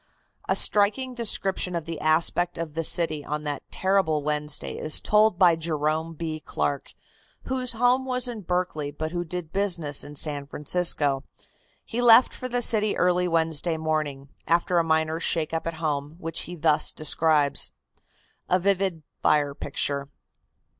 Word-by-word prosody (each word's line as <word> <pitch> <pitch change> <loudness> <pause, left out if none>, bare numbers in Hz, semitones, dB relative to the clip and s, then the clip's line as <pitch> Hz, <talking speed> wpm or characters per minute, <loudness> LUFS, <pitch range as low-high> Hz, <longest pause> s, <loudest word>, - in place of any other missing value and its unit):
A - - +3
striking 215 +6 +2
description 195 -6 0
of 165 -2 -3
the 165 -2 -6
aspect 170 +3 +2
of 165 -2 -5
the 165 +1 -2
city 155 -2 +1
on 150 +1 -4
that 145 -2 -4
terrible 190 -6 +1
Wednesday 150 0 -2
is 155 - +1
told 215 -3 +3
by 175 -3 +5
Jerome 160 0 -2
B. 155 0 -4
Clark, 145 -1 -3 0.5
whose 255 -2 -1
home 245 +3 +2
was 250 -1 +2
in 235 -3 -6
Berkeley, 180 -5 -2
but 155 +2 -5
who 175 0 -2
did 175 -1 -6
business 170 -8 0
in 145 0 -10
San 145 -1 -2
Francisco. 145 -3 +1 0.6
He 240 +1 -3
left 240 +1 +6
for 255 - -6
the 245 0 +1
city 215 -2 +3
early 180 0 +2
Wednesday 165 -1 +1
morning, 155 -3 -3 0.2
after 170 +1 +2
a - - +2
minor 160 0 0
shake 165 -2 -1
up 165 0 -2
at 165 - -3
home, 150 -2 -3
which 165 -2 -2
he 175 - -6
thus 155 -2 +2
describes: 155 -2 +2 0.8
A 180 - +4
VIVID 190 -3 0 0.2
FIRE 145 -2 +2
PICTURE. 140 0 -2
165 Hz, 155 wpm, -25 LUFS, 150-185 Hz, 0.8 s, left